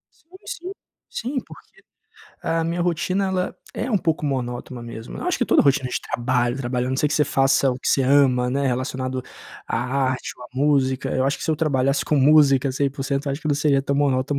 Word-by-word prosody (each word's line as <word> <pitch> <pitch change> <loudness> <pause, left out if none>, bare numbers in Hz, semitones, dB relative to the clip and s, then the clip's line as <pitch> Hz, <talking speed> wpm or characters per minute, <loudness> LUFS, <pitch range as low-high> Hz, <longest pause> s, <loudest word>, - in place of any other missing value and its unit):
Sim, 320 - -32 0.2
sim. 360 +3 -6 0.4
Sim, 265 +4 -3
porque - - -17 0.6
a 165 0 0
minha 170 +1 -2
rotina, 180 +3 0
ela 185 -1 -2 0.2
é 245 +4 -3
um 205 - +3
pouco 160 -2 -1
monótona 125 -2 -3
mesmo. 115 0 -8
Eu - - -5
acho 360 - +1
que 245 - +2
toda - - +4
rotina 140 -2 +2
de - - -2
trabalho, 120 0 0
trabalho, 125 -1 -2
a - - -2
não 130 - -1
ser 150 - +2
que - - -1
você 150 - +3
faça 135 0 +3
o 125 - -4
que - - -7
você 135 - +3
ama, 130 -2 +4
né, 140 +2 0
relacionado 130 0 -2 0.4
à - - -2 0.3
arte 130 - -4
ou 125 - -11
à - - -11
música. 135 -2 +1
Eu 130 - +1
acho 140 - +1
que - - -6
se - - 0
eu 155 - +1
trabalhasse 140 -3 +1
com 150 - +1
música 140 -1 +5
100%, 140 +1 -2
eu 140 - 0
acho 140 - -5
que 155 - -2
não 145 - +3
seria 140 -1 +2
tão 140 0 -1
monótono 140 -2 +2
ou 130 - -1
140 Hz, 230 wpm, -22 LUFS, 130-150 Hz, 0.6 s, música